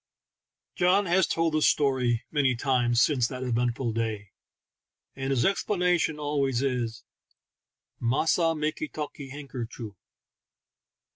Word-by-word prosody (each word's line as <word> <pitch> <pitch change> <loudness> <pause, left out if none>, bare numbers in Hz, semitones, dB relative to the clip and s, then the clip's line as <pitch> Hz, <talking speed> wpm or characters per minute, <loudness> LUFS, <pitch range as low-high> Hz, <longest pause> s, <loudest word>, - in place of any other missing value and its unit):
John 185 +3 +3
has 180 0 +3
told 165 -1 0
the 155 - +1
story 130 -6 +2
many 135 -4 +2
times 120 -2 +1
since 130 -6 +2
that 130 0 -6
eventful 120 0 -1
day, 110 -3 -3 0.8
and 135 0 -3
his 135 -3 +2
explanation 180 -5 +1
always 140 -4 0
is, 120 -4 -2 0.5
" - - -59
Massa 165 +4 +2
makee 155 - -2
talkee 145 -2 -6
han 140 +1 -8
ker 125 -3 -4
choo! 110 -3 -9
135 Hz, 125 wpm, -27 LUFS, 120-155 Hz, 0.8 s, John